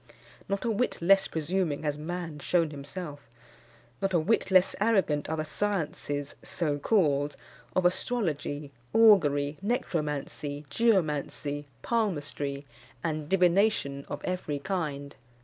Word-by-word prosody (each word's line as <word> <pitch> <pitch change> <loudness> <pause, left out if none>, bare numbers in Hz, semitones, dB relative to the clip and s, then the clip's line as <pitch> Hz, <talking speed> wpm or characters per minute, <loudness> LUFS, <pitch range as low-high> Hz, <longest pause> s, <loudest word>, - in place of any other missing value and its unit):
Not 200 +3 -1
a 230 - +2
whit 205 -2 0
less 195 +3 +5
presuming 160 -1 -1
has 150 -1 0
man 165 0 -5
shewn 165 +1 +1
himself; 145 -2 -7 0.7
not 195 -2 +1
a - - +5
whit 200 +7 +1
less 185 -1 +5
arrogant 195 -11 +2
are 160 - -1
the 155 - -1
sciences, 155 -6 -2
so 150 -5 -2
called, 145 -6 +2 0.4
of 185 - +2
astrology, 155 - -1 0.2
augury, 150 -10 +5
necromancy, 150 - -2
geomancy, 150 -8 +1 0.2
palmistry, 145 -10 -1 0.4
and 155 -2 -2
divination 180 -6 +3
of - - -5
every 180 -5 -2
kind. 145 -4 -3
160 Hz, 115 wpm, -29 LUFS, 145-195 Hz, 0.7 s, less